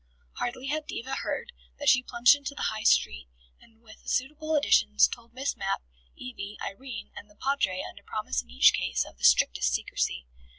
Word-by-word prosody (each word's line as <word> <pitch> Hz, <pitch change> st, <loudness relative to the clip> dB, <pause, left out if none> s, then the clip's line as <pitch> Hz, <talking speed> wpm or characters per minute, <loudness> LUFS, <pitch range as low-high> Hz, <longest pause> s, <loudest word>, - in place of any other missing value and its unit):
Hardly 245 Hz, +2 st, -3 dB
had 300 Hz, +2 st, -2 dB
Diva 265 Hz, +3 st, -5 dB
heard, 485 Hz, -, -4 dB, 0.3 s
than 290 Hz, -, -6 dB
she 250 Hz, -3 st, +6 dB
plunged 245 Hz, +1 st, +5 dB
into 285 Hz, 0 st, -7 dB
the -, -, -1 dB
High 215 Hz, -, -5 dB
Street, 70 Hz, -, +2 dB, 0.3 s
and, 225 Hz, 0 st, -24 dB
with 215 Hz, -1 st, -17 dB
suitable 305 Hz, +4 st, -1 dB
additions, 215 Hz, -7 st, +4 dB
told 235 Hz, -1 st, -10 dB
Miss 265 Hz, +3 st, -3 dB
Mapp, 195 Hz, -, -2 dB, 0.3 s
Evie, 200 Hz, +12 st, -8 dB
Irene 250 Hz, +3 st, -7 dB
and 210 Hz, -, -10 dB
the 205 Hz, -, -22 dB
Padre 210 Hz, -8 st, -1 dB
under -, -, -12 dB
promise 65 Hz, 0 st, -3 dB
in -, -, -25 dB
each 60 Hz, -, +5 dB
case, -, -, 0 dB
of -, -, -15 dB
the -, -, -15 dB
strictest 60 Hz, 0 st, +4 dB
secrecy. -, -, -2 dB
235 Hz, 180 wpm, -28 LUFS, 195-275 Hz, 0.3 s, she